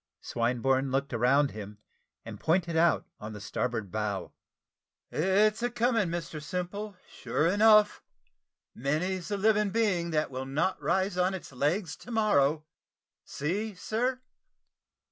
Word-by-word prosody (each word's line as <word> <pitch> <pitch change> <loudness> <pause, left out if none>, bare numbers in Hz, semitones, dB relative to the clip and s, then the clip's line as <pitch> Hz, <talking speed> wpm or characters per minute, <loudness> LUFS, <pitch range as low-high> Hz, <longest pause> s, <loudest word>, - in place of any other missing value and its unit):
Swinburne 130 +3 0
looked 135 0 -1
around 135 +4 +3
him, 105 -1 -8 0.5
and - - -8
pointed 170 0 +1
out 165 +1 +3
on 105 +1 -7
the 105 - -8
starboard 110 0 -3
bow. 105 -3 -3 0.8
"It's 205 +6 +2
a 245 - +1
coming, 235 -4 +1
Mr 165 -2 -4
Simple, 185 +5 -4
sure 150 - -2
enough; 210 +3 +5 0.7
many's 170 +8 -1
the 205 - -2
living 210 0 +3
being 190 -6 +1
that 155 -3 0
will 130 0 -5
not 150 +8 -1
rise 185 +1 0
on 185 +1 +2
its 180 - -9
legs 150 +7 -1
to - - -14
morrow. 155 - +2 0.6
See, 200 +9 -3
sir." 240 +8 -1
170 Hz, 130 wpm, -29 LUFS, 135-205 Hz, 0.8 s, enough